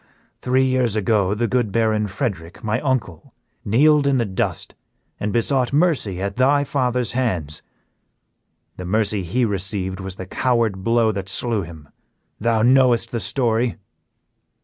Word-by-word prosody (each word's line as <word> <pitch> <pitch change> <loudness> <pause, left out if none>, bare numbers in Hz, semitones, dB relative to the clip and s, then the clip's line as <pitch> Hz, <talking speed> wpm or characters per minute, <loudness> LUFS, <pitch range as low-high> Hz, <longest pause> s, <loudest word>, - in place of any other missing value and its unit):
Three 130 +1 +2
years 130 -4 +1
ago 105 -2 +1
the 120 +2 0
good 120 -3 0
Baron 110 -1 +1
Frederick, 95 -6 -5
my 110 +2 -1
uncle, 130 - -3 0.3
kneeled 145 +6 +3
in 140 -1 +2
the 120 - +1
dust 95 -2 -3 0.5
and 105 - -2
besought 125 +2 +1
mercy 145 - +1
at 100 +2 -4
thy 140 +3 +3
father's 125 -3 -1
hands; 90 - -2 1.2
the 90 - -6
mercy 105 +1 0
he 105 +8 0
received 95 -2 -2
was 95 -1 -5
the 95 - -7
coward 115 -2 0
blow 115 0 +2
that 100 -2 -4
slew 115 +2 -1
him. 80 -4 -10 0.5
Thou 115 0 +1
knowest 125 -2 +3
the 115 - -2
story?" 115 0 0
115 Hz, 145 wpm, -21 LUFS, 95-125 Hz, 1.2 s, kneeled